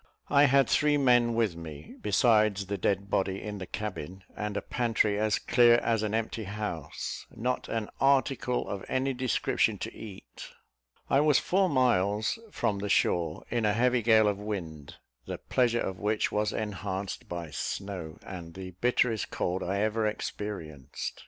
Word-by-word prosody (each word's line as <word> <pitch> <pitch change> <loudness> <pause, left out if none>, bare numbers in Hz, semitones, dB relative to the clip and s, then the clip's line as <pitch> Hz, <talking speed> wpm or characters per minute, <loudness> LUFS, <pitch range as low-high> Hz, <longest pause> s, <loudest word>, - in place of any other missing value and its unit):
I 145 0 +6
had 135 -2 +4
three 150 0 +3
men 120 -4 +4
with 110 -7 +1
me, 80 -3 -9
besides 105 -1 +3
the 100 +1 -3
dead 100 +2 0
body, 95 0 0
in 105 -1 -6
the 95 - -6
cabin, 95 -3 -5
and 105 -1 -3
a - - -1
pantry 110 -4 +1
as 110 -1 +2
clear 120 -1 +5
as 115 -2 +1
an 110 0 -1
empty 110 -1 -2
house: 100 -6 -5
not 125 +3 -3
an 110 -2 -2
article 135 -2 +2
of 100 - -4
any 135 +1 0
description 130 -3 +1
to - - -5
eat. 105 -4 -10 0.6
I 135 - +3
was 150 -1 +4
four 190 0 +2
miles 110 - +2
from 100 - -1
the 100 +1 -3
shore, 85 -3 +1
in 120 -2 0
a 105 -1 +3
heavy 125 +2 +2
gale 110 -1 +5
of 100 -1 0
wind, 85 -9 -6 0.3
the - - -4
pleasure 120 -2 +1
of 95 -1 -3
which 105 +1 0
was 105 0 0
enhanced 100 -2 -4
by 85 -3 -5
snow, 90 0 -4
and 85 -3 -8
the 95 -1 -7
bitterest 120 -2 +1
cold 90 +2 -2
I 100 +3 -1
ever 110 0 +1
experienced. 85 - -5
105 Hz, 165 wpm, -29 LUFS, 95-120 Hz, 0.6 s, I